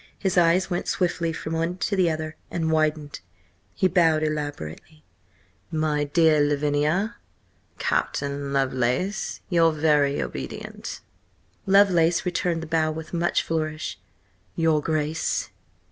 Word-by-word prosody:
His 190 -3 -1
eyes 175 +1 +4
went 175 -1 -3
swiftly 175 -2 0
from 160 0 -5
one 165 +2 -1
to 200 +3 -1
the 185 -3 +3
other 155 0 -4
and 160 -2 -1
widened. 155 -2 0 0.6
He 190 - +3
bowed 165 -4 +3
elaborately. 150 - -5 0.7
"My 155 -2 0
dear 155 +1 +4
Lavinia! 150 +8 +1 0.6
Captain 140 0 -1
Lovelace, 135 - -1
your 165 -2 +4
very 150 -2 +2
obedient!" - - -6 0.7
Lovelace 180 -4 +4
returned 175 -2 -1
the - - -5
bow 160 -1 +1
with 155 +1 -6
much 175 0 +1
flourish. 155 -1 -3 0.6
"Your 160 -2 +2
Grace!" 155 0 -1
160 Hz, 115 wpm, -25 LUFS, 150-170 Hz, 0.7 s, eyes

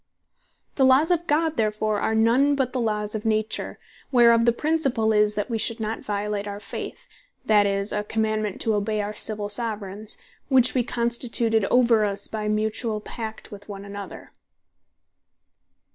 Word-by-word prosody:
The 270 - +3
Laws 265 +6 +5
of 345 -1 0
God 320 +1 +1
therefore 215 -1 0
are 220 - 0
none 245 +6 +3
but 265 -3 -1
the 255 - -1
Laws 210 -2 -1
of 215 -1 -3
Nature, 220 0 -1 0.3
whereof 235 -2 +5
the 235 - +5
principall 270 -5 +1
is, 210 0 +3
that 205 0 -2
we 230 -2 -2
should 230 +2 -1
not 220 0 -3
violate 205 0 -3
our 200 0 -5
Faith, - - -7 0.4
that 210 -2 +4
is, 200 +1 -1
a 210 - -1
commandement 215 -1 -1
to 225 - +1
obey 210 +1 -1
our 205 +1 -4
Civill 210 -1 -1
Soveraigns, 210 -2 -2 0.3
which 255 -2 +4
wee 255 - +2
constituted 235 -2 0
over 235 -1 +4
us, 200 -1 -1
by 215 -1 -4
mutuall 215 +1 -1
pact 220 -2 -7
one 205 - -8
with 200 -1 -8
another. 200 0 -9
220 Hz, 160 wpm, -24 LUFS, 210-235 Hz, 0.4 s, Laws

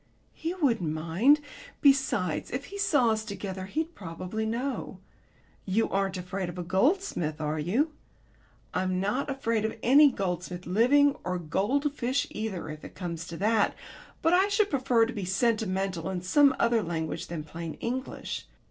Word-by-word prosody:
"He 330 +3 -4
wouldn't 230 - +1
mind. 170 - +3 0.4
Besides, 265 - +2
if 270 +3 -4
he 400 - -8
saw 280 - +3
us 220 0 -1
together 190 -2 -5
he'd 320 - -2
probably 185 - -4
know. 250 +4 -3 0.6
You 210 +4 +1
aren't 195 -1 0
afraid 180 0 -4
of 175 - -8
a 180 - -3
goldsmith, 190 - +1
are 155 0 -1
you?" 230 - +1 0.8
"I'm 185 0 0
not 210 +10 -1
afraid 230 -5 0
of 220 - -2
any 280 +4 +7
goldsmith 180 -3 -3
living 265 +10 +4
or 180 +1 -1
goldfish 250 - 0
either, 210 -6 -4
if 155 0 -8
it - - -10
come 175 -3 -4
to 165 +1 -7
that. 215 +2 +2 0.5
But 325 +1 +4
I 375 +2 +5
should 410 0 +2
prefer 255 -4 +3
to 240 - -5
be 205 - -4
sentimental 190 -3 0
in 180 -2 -3
some 280 +9 +5
other 235 -1 +3
language 165 -3 -3
than 165 -3 -5
plain 165 +1 -6
English. 255 +3 -4
210 Hz, 155 wpm, -28 LUFS, 180-270 Hz, 0.8 s, any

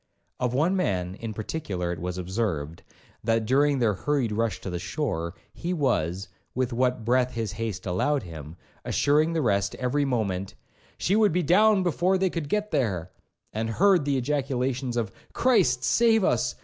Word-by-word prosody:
Of 125 0 0
one 165 +8 +2
man, 90 - -1
in 110 +3 -6
particular, 100 - -3
it 85 - -7
was 90 +2 -4
observed, 90 -5 -3 0.4
that 115 0 +1
during 140 +4 +3
their 115 -4 +2
hurried 130 +3 0
rush 110 +1 -1
to 95 - -5
the 90 - -3
shore, 90 - -3 0.2
he 175 +2 -3
was, 100 - 0 0.3
with 130 -1 0
what 125 -1 0
breath 125 +1 +2
his 110 -4 -2
haste 105 -3 -4
allowed 110 +10 0
him, 80 -3 -9 0.3
assuring 155 +3 +2
the 160 -2 0
rest 100 -3 +1
every 140 +3 0
moment, 100 -7 -2 0.4
'she 195 - +1
would 215 -2 +4
be 180 +2 +1
down 205 +3 +4
before 180 +2 +2
they 190 -1 +1
could 155 -4 -4
get 210 +2 -1
there,' 95 -9 -1 0.4
and 110 +1 -2
heard 185 - +4
the 140 -2 +1
ejaculations 130 -2 -1
of 110 -4 -1 0.2
'Christ 255 -1 +3
save 225 -2 +4
us! 120 -5 +1
125 Hz, 170 wpm, -26 LUFS, 100-150 Hz, 0.4 s, would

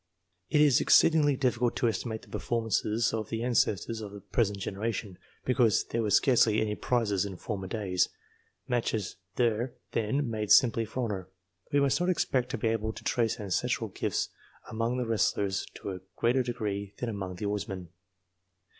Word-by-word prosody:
It 150 - +4
is 145 -5 +5
exceedingly 150 -3 +5
difficult 125 -2 +1
to 120 - +1
estimate 110 +1 -2
the - - -15
performances 115 -1 0
of 110 -2 -3
the 115 0 -2
ancestors 115 -2 +1
of 105 -2 -6
the 100 - -9
present 105 0 0
generation, 100 -1 -4 0.3
because 120 -4 +3
there 115 - 0
were 110 - 0
scarcely 110 -1 +4
any 105 -1 0
prizes 105 -4 0
in 100 -3 -5
former 95 -2 -4
days; 95 -3 0 0.6
matches 115 -5 -1 0.2
were 120 0 +1 0.2
then 120 +6 0
made 110 -2 -3
simply 115 -3 +6
for 125 +4 -3
honour. 95 -5 -3 0.4
We 145 - +4
must 140 +1 +2
not 180 +1 +1
expect 130 -7 +1
to - - -2
be 110 +1 0
able 110 0 -1
to - - -10
trace 115 -3 0
ancestral 100 -4 -1
gifts - - -1 0.4
among 115 +3 -1
the 125 - -1
wrestlers 100 -3 0
to 100 - -5
a 95 - -6 0.2
greater 120 +3 +2
degree 105 -5 -3
than 120 - -3
among 95 -4 -4
the 95 - -5
oarsmen. 100 -3 -3
110 Hz, 170 wpm, -29 LUFS, 100-120 Hz, 0.6 s, simply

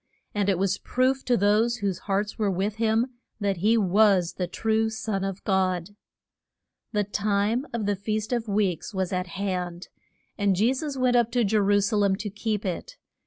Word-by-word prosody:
And 205 -1 +1
it 190 - +2
was 190 +1 0
proof 260 +1 0
to 245 -1 +3
those 210 +4 +3
whose 195 -5 -2
hearts 205 +2 -1
were 210 -2 +2
with 195 +3 -1
him 225 +1 +2 0.3
that 200 -3 0
he 215 +6 +3
was 195 -3 +3
the 180 - -3
true 220 +4 0
Son 220 -3 -3
of 195 -1 -4
God. 190 -1 0 1.0
The 210 -2 +1
time 205 +5 0
of 235 -3 -2
the 205 0 +1
Feast 215 +3 -2
of 235 -2 -1
Weeks 200 -2 -1
was 190 -1 -1
at 180 0 -1
hand, 180 -1 -4 0.5
and 200 -2 +2
Je 225 +7 +3
sus 280 +1 -4
went 255 -1 +2
up 240 -1 +3
to 245 -1 +3
Je 215 +1 0
ru 205 0 +3
sa 210 +2 0
lem 200 -2 +3
to 210 0 -5
keep 210 0 -2
it. 485 - -4
205 Hz, 190 wpm, -26 LUFS, 195-220 Hz, 1.0 s, to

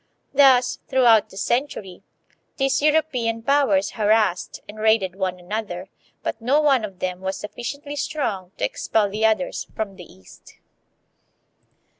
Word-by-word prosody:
Thus, 260 -3 +5
throughout 240 -5 +4
the 190 - -13
century, 220 -6 -2 0.6
these 270 -1 +1
European 260 -7 +1
powers 235 -8 +2
harassed 210 -4 +1
and 210 +1 -10
raided 215 -4 +2
one 190 -2 -2
another, 185 -1 -5 0.3
but 225 - -3
no 265 +6 +3
one 275 -6 +3
of 195 -3 -6
them 185 -1 -3
was 190 0 -3
sufficiently 280 +7 -6
strong 210 - -3
to - - 0
expel 210 -3 0
the 220 +2 +2
others 220 +5 -1
from 200 -3 -4
the 180 - -12
East. 95 0 -17
220 Hz, 135 wpm, -23 LUFS, 190-265 Hz, 0.6 s, Thus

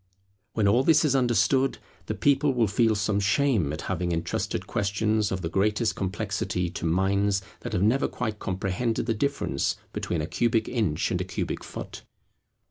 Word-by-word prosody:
When 110 -3 +2
all 115 +6 +4
this 160 +1 +5
is 140 -2 +2
understood, 130 +1 +2 0.3
the - - -2
people 140 -1 +2
will 120 -2 +3
feel 110 +2 +2
some 100 0 0
shame 105 - +2
at 75 - -4
having 90 -2 -2
entrusted 85 +1 -2
questions 105 +1 0
of 95 -1 -3
the - - 0
greatest 105 +6 +1
complexity 95 -2 -2
to 85 - -3
minds 95 +3 +1 0.2
that - - -6
have 90 - +1
never 115 +6 +3
quite 110 -3 -4
comprehended 95 +5 -1
the 115 - +1
difference 140 +6 -1 0.2
between 85 -3 -2
a - - -2
cubic 115 +5 +1
inch 105 -11 0
and - - 0
a - - 0
cubic - - -4
foot. - - -8
105 Hz, 170 wpm, -26 LUFS, 95-120 Hz, 0.3 s, this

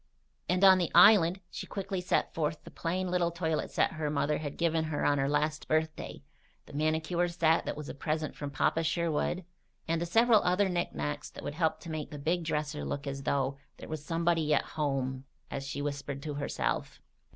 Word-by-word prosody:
And 180 +2 +2
on 190 -1 +8
the 175 - 0
island 185 -1 +7
she - - -6
quickly 195 -2 -3
set 180 - 0
forth 155 -1 -2
the - - -11
plain 180 +2 -2
little 180 -1 +2
toilet 160 -2 -1
set - - +1
her 155 -2 -2
mother 150 0 0
had 145 -2 -5
given 165 -1 +1
her 155 -2 -2
on 145 -1 +3
her 135 0 +1
last 150 +1 0
birthday, 155 0 -1 0.4
the - - -14
manicure 155 +3 +1
set 165 -1 +2
that - - -3
was 150 -1 -6
a - - -5
present 155 +2 -2
from 145 - -5
Papa 160 +4 +1
Sherwood, 170 +2 0 0.4
and 165 0 0
the 170 - -1
several 225 +3 +5
other 185 +2 +2
knickknacks 75 - -2
that - - -11
would - - -4
help 160 0 0
to 170 - -7
make 155 -2 -4
the 150 - -7
big 165 +5 0
dresser 150 -1 -2
look 140 0 -4
as 140 0 -4
though 140 0 0 0.2
"there - - -10
was 155 -2 -5
somebody 165 -1 +1
at - - +2
home," 135 -3 -1 0.3
as 135 0 -4
she 140 0 -3
whispered 140 -1 -4
to 150 - -4
herself. 140 0 -2
155 Hz, 200 wpm, -30 LUFS, 145-170 Hz, 0.4 s, on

